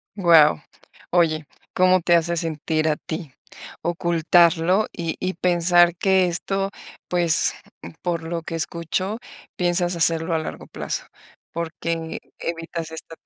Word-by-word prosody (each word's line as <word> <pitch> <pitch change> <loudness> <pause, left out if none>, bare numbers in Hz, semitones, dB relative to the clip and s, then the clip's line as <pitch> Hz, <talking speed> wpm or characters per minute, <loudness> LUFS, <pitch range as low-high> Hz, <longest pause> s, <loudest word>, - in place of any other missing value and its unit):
Guau. 165 - +5 0.5
Oye, 155 -4 +2 0.3
¿cómo 185 0 +4
te 170 0 +3
hace 170 +1 +2
sentir 160 -1 -1
a 155 - +2
ti 160 -4 -7 0.5
ocultarlo 170 +2 +3
y 165 -2 -4
y 185 +1 -2
pensar 175 0 +3
que 190 0 +3
esto, 195 +3 -1 0.4
pues, 175 -2 +2 0.5
por 170 -2 -2
lo 165 +1 -3
que 165 0 -6
escucho, 170 +6 -2 0.4
piensas 175 0 +1
hacerlo 165 0 +1
a 160 - +2
largo 155 - -6
plazo? - - -4 0.5
¿Porque 165 0 -4 0.2
evitas 165 -1 -4
esta? 160 0 -8
170 Hz, 120 wpm, -23 LUFS, 165-175 Hz, 0.5 s, Guau